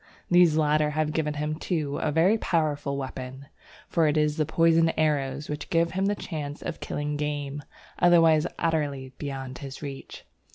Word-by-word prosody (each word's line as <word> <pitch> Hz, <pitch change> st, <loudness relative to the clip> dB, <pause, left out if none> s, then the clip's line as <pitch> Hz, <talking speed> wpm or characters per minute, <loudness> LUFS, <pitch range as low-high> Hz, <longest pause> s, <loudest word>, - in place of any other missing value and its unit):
These 175 Hz, -3 st, +6 dB
latter 150 Hz, -1 st, +3 dB
have 155 Hz, 0 st, -1 dB
given 150 Hz, -2 st, -1 dB
him, 150 Hz, +1 st, -2 dB
too, 155 Hz, -3 st, -2 dB
a 155 Hz, -, 0 dB
very 170 Hz, +8 st, +4 dB
powerful 145 Hz, -6 st, 0 dB
weapon, 130 Hz, 0 st, -6 dB, 0.4 s
for 165 Hz, -2 st, +2 dB
it 150 Hz, +1 st, +1 dB
is 150 Hz, 0 st, +1 dB
the 155 Hz, -2 st, +1 dB
poisoned 165 Hz, 0 st, +4 dB
arrows 145 Hz, -2 st, 0 dB
which 150 Hz, 0 st, -5 dB
give 170 Hz, 0 st, +2 dB
him 190 Hz, +1 st, 0 dB
the 205 Hz, -, +1 dB
chance 150 Hz, -7 st, -6 dB
of -, -, -5 dB
killing 145 Hz, 0 st, -3 dB
game, 145 Hz, -1 st, -3 dB, 0.4 s
otherwise 165 Hz, -2 st, +5 dB
utterly 145 Hz, -5 st, -1 dB
beyond 135 Hz, -3 st, -5 dB
his 135 Hz, +1 st, -8 dB
reach. 140 Hz, -2 st, -8 dB
150 Hz, 165 wpm, -26 LUFS, 145-165 Hz, 0.4 s, These